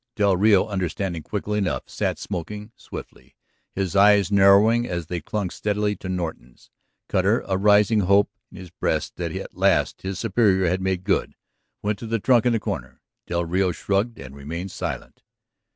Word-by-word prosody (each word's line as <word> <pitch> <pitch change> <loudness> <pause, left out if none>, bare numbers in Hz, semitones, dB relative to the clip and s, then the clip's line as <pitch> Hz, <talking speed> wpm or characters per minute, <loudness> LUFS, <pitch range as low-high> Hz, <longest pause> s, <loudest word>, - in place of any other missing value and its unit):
Del 100 -2 +3
Rio, 100 +1 +4
understanding 95 -3 -3
quickly 105 +4 -3
enough, 95 -4 -2
sat - - -2
smoking 105 +4 -6
swiftly, - - -11 0.4
his 95 -1 -3
eyes 100 -1 +5
narrowing 100 +4 +5
as 85 -2 -3
they 85 +1 -4
clung 95 +2 -3
steadily 105 0 -1
to 95 - -7
Norton's. 80 -9 -6 0.4
Cutter, - - +2
a 95 - 0
rising 105 +2 +4
hope 100 +1 +3 0.2
in - - -14
his 90 -2 -10
breast - - -2
that - - -3
at - - -7
last - - +2
his 95 0 -4
superior 100 -4 +2
had 90 +2 0
made 95 -1 -1
good, - - 0 0.5
went 105 0 -1
to 115 - -7
the 115 +1 0
trunk 120 +2 +3
in 120 - +3
the 115 - +1
corner. 65 -9 -5 0.3
Del 85 0 -1
Rio 90 +2 +1
shrugged 100 +7 -1
and 70 0 -10
remained 85 +7 -6
silent. - - -6
100 Hz, 170 wpm, -23 LUFS, 90-105 Hz, 0.5 s, eyes